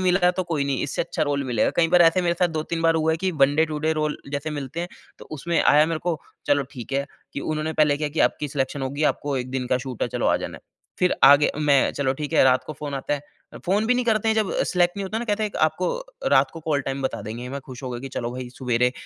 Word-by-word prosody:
मिलता 180 Hz, -1 st, +3 dB
तो 185 Hz, +1 st, -2 dB
कोई 155 Hz, -5 st, -1 dB
नहीं 140 Hz, -3 st, -1 dB
इससे 140 Hz, -, -1 dB
अच्छा 170 Hz, -, -3 dB
रोल 140 Hz, -2 st, 0 dB
मिलेगा। 120 Hz, -4 st, +1 dB
कई 165 Hz, -1 st, +4 dB
बार 175 Hz, +1 st, +6 dB
ऐसे 170 Hz, +2 st, +4 dB
मेरे 170 Hz, 0 st, +1 dB
साथ 180 Hz, -1 st, +3 dB
2-3 165 Hz, +1 st, -3 dB
बार 165 Hz, 0 st, +4 dB
हुआ 160 Hz, 0 st, +2 dB
है -, -, 0 dB
कि 185 Hz, -, +2 dB
one 140 Hz, +1 st, +5 dB
day 160 Hz, -, +5 dB
to 150 Hz, -1 st, -4 dB
day 160 Hz, +1 st, +1 dB
role 150 Hz, -1 st, -1 dB, 0.2 s
जैसे 145 Hz, +2 st, -3 dB
मिलते 145 Hz, +2 st, -5 dB
हैं 175 Hz, -, -4 dB, 0.3 s
तो -, -, -11 dB
उसमें 170 Hz, +4 st, 0 dB
आया 150 Hz, +1 st, +5 dB
मेरे 165 Hz, -1 st, -2 dB
को, 170 Hz, -3 st, -2 dB, 0.3 s
चलो 145 Hz, -1 st, +3 dB
ठीक 125 Hz, +1 st, -8 dB
है 140 Hz, +1 st, 0 dB, 0.3 s
कि -, -, -4 dB
उन्होंने 155 Hz, +1 st, -2 dB
पहले 150 Hz, -2 st, +3 dB
क्या 150 Hz, 0 st, -2 dB
कि 155 Hz, -, -3 dB
आपकी 150 Hz, -, -6 dB
सिलेक्शन 135 Hz, 0 st, -2 dB
होगी 140 Hz, +3 st, -3 dB
आपको 145 Hz, -2 st, -4 dB
एक 125 Hz, 0 st, -4 dB
दिन 130 Hz, -1 st, -2 dB
का 125 Hz, -, +1 dB
शूट 130 Hz, -3 st, -6 dB
है -, -, +1 dB
चलो -, -, -1 dB
आ -, -, +4 dB
जाना -, -, -6 dB
है। -, -, -28 dB, 0.4 s
फ़िर 180 Hz, -, +3 dB
आगे 145 Hz, +2 st, +7 dB
मैं 145 Hz, -3 st, +3 dB
चलो 135 Hz, -2 st, 0 dB
ठीक 150 Hz, +2 st, -5 dB
है -, -, +5 dB
रात 130 Hz, -1 st, +3 dB
को 155 Hz, -, -5 dB
फ़ोन 145 Hz, -1 st, -6 dB
आता 135 Hz, +2 st, -1 dB
है। 145 Hz, -, -5 dB, 0.4 s
फ़ोन 205 Hz, +4 st, +1 dB
भी 250 Hz, -, +3 dB
नहीं 250 Hz, 0 st, 0 dB
करते 225 Hz, -1 st, +1 dB
हैं 220 Hz, -, +3 dB
जब 215 Hz, -3 st, 0 dB
सेलेक्ट 175 Hz, +1 st, +1 dB
नहीं 200 Hz, -, -3 dB
होता 215 Hz, +4 st, -3 dB
ना 240 Hz, -, -3 dB
कहते 215 Hz, -1 st, -1 dB
हैं 210 Hz, -, -1 dB
आपको 155 Hz, +4 st, 0 dB, 0.4 s
रात -, -, +4 dB
को 165 Hz, -, -9 dB
कॉल 150 Hz, -2 st, 0 dB
टाइम 135 Hz, 0 st, -4 dB
बता 130 Hz, -, -2 dB
देंगे। 120 Hz, +4 st, -6 dB
मैं 140 Hz, +1 st, -5 dB
खुश 130 Hz, 0 st, -11 dB
हो 130 Hz, -, -4 dB
गया 120 Hz, -1 st, -5 dB
कि 135 Hz, -, -6 dB
चलो 120 Hz, -2 st, -4 dB
भई 125 Hz, -1 st, -6 dB
सुवेरे 125 Hz, -1 st, +1 dB
150 Hz, 285 wpm, -24 LUFS, 135-170 Hz, 0.4 s, आगे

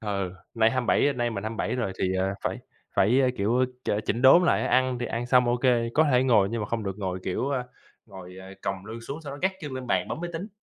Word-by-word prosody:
ừ, 100 Hz, -4 st, -3 dB, 0.2 s
nay 115 Hz, -1 st, +4 dB
27, 130 Hz, +3 st, +2 dB
nay 120 Hz, -2 st, -1 dB
mình 105 Hz, -1 st, -5 dB
27 110 Hz, +1 st, -2 dB
rồi 115 Hz, -6 st, -2 dB
thì, 95 Hz, 0 st, 0 dB
ờ, 95 Hz, +1 st, +1 dB, 0.2 s
phải -, -, -2 dB, 0.4 s
phải, 120 Hz, +8 st, +4 dB
a, 130 Hz, -, +3 dB
kiểu, 115 Hz, +6 st, +2 dB, 0.2 s
ch -, -, -1 dB, 0.2 s
chỉnh 120 Hz, +4 st, -1 dB
đốn 155 Hz, +7 st, +8 dB
lại -, -, +3 dB
á, -, -, -1 dB
ăn 130 Hz, -1 st, +2 dB
thì 120 Hz, -, -3 dB
ăn 120 Hz, +1 st, -3 dB
xong, 125 Hz, -1 st, +4 dB
OK, 120 Hz, 0 st, 0 dB, 0.3 s
có 160 Hz, -, +5 dB
thể 125 Hz, +1 st, +4 dB
ngồi, 110 Hz, -7 st, +4 dB
nhưng 115 Hz, -1 st, -2 dB
mà -, -, -3 dB
không 115 Hz, -1 st, -2 dB
được 95 Hz, +1 st, -4 dB
ngồi, 95 Hz, -2 st, -3 dB
kiểu, 110 Hz, +9 st, -1 dB
ờ, 130 Hz, -3 st, -1 dB, 0.4 s
ngồi, 95 Hz, -3 st, -11 dB
ờ, 95 Hz, +1 st, -11 dB
còng 95 Hz, 0 st, -4 dB
lương 115 Hz, +2 st, -7 dB
xuống 140 Hz, +7 st, -7 dB
sau 140 Hz, -, -7 dB
đó 140 Hz, -, -8 dB
gác 190 Hz, 0 st, +2 dB
chân 145 Hz, -4 st, -6 dB
lên 130 Hz, -1 st, -6 dB
bàn, -, -, 0 dB
bấm 160 Hz, -, -4 dB
máy 175 Hz, -, -4 dB
tính. 180 Hz, +6 st, -5 dB
120 Hz, 265 wpm, -26 LUFS, 100-130 Hz, 0.4 s, đốn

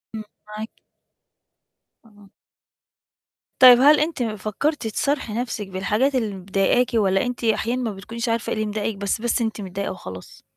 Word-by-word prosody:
امم، 215 Hz, -, -5 dB, 0.2 s
معاكِ. 215 Hz, +1 st, -7 dB, 1.4 s
آه. 205 Hz, -2 st, -20 dB, 1.3 s
طيب 250 Hz, -1 st, +9 dB
هل 295 Hz, +2 st, +6 dB
أنتِ 305 Hz, -4 st, -1 dB
فكّرتي 220 Hz, +5 st, -2 dB
تصارحي 275 Hz, -2 st, -1 dB
نَفْسِك 225 Hz, -3 st, -3 dB
بالحاجات 210 Hz, +8 st, 0 dB
اللي 220 Hz, -5 st, -1 dB
مضايقاكِ، 195 Hz, +6 st, +1 dB
والّا 195 Hz, -3 st, +2 dB
أنتِ 245 Hz, 0 st, -5 dB
أحيانًا 230 Hz, +2 st, 0 dB
ما 230 Hz, -3 st, -2 dB
بتكونيش 230 Hz, +4 st, -5 dB
عارفة 230 Hz, -1 st, -1 dB
إيه -, -, 0 dB
اللي 215 Hz, 0 st, -1 dB
مضايقِك 210 Hz, 0 st, -3 dB
بس 200 Hz, +2 st, -2 dB
بس 240 Hz, +1 st, 0 dB
أنتِ 220 Hz, -2 st, -2 dB
متضايقة 195 Hz, +1 st, -4 dB
وخلاص؟ 95 Hz, -, -10 dB
220 Hz, 150 wpm, -22 LUFS, 200-245 Hz, 1.4 s, طيب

